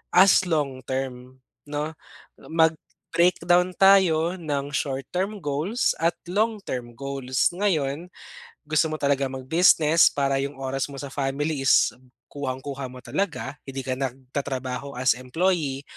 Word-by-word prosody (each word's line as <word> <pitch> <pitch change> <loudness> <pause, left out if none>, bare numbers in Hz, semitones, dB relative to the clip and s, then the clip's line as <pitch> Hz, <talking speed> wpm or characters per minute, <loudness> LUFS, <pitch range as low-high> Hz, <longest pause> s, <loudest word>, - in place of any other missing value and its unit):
as 190 +1 +7
long-term 130 -4 -3 0.3
'no, 150 +1 -3 0.6
mag 160 -1 +4 0.4
breakdown 175 +1 +3
tayo 185 -3 +5
ng 145 -4 -3
short-term 180 +11 -2
goals 155 - 0
at 170 - +4 0.2
long 215 +4 0
term 120 -2 -4
goals. 135 -2 0
Ngayon, 170 -4 -1 0.6
gusto 155 +1 +2
mo 155 - -4
talagang 140 -1 +1
mag-business 160 +3 +4
para 140 -1 0
'yung 140 0 -4
oras 135 +1 -2
mo 135 - -8
sa 140 - -5
family 140 +1 -2
is 135 - +4 0.4
kuhang-kuha 135 -1 -5
mo 125 - -10
talaga 160 +2 -3
hindi 135 0 -4
ka 130 - 0
nagtatrabaho 130 0 -4
as 130 0 +3
employee, 140 +1 -1
140 Hz, 125 wpm, -25 LUFS, 135-170 Hz, 0.6 s, as